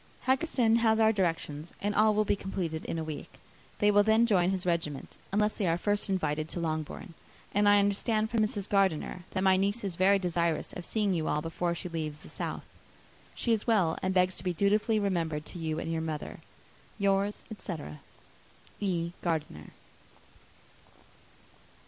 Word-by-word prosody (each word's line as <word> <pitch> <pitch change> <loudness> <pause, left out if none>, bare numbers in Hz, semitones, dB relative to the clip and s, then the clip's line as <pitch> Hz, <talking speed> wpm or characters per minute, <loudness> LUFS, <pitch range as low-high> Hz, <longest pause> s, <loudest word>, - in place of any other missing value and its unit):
Haggerston 260 -4 +3
has 225 -1 +3
our 220 0 +5
directions, 165 -5 -2
and 205 +1 -1
all 215 0 +4
will 215 0 +2
be - - +2
completed 180 -5 -4
in - - -3
a 160 - -2
week. 155 -1 -7 0.4
They 210 -1 +4
will 205 0 +6
then 220 +2 +4
join 185 -6 +3
his 190 -1 -1
regiment, 165 -5 -2 0.2
unless 210 +1 +2
they 195 - -1
are 165 0 +2
first 205 +2 0
invited 155 -4 -1
to - - -4
Longbourn; 160 +3 -4 0.4
and 205 0 +4
I 205 - +7
understand 215 +2 +1
from 230 - +1
Mrs. 210 -2 0
Gardiner 190 -3 +1
that 185 - -2
my 190 -1 +5
niece 200 +4 0
is 185 -4 -4
very 195 +2 +5
desirous 170 -3 -1
of 180 - -7
seeing 210 -3 0
you 160 -3 -1
all 150 - +1
before 170 +1 -2
she 180 - -5
leaves 155 -3 -4
the - - -13
south. - - -4 0.7
She 235 - +1
is 215 - -1
well, 190 -8 +3
and 185 - 0
begs 185 0 +3
to - - -5
be 180 -1 0
dutifully 210 +5 +2
remembered 165 -6 -1
to 175 - -8
you 160 -1 -2
and 165 0 -3
her 160 - -1
mother. 155 -2 -5 0.6
Yours, 200 0 +1
etc. 170 - -6 0.8
"E. 175 -4 -1
GARDINER." 155 - -3
185 Hz, 175 wpm, -30 LUFS, 165-205 Hz, 0.8 s, I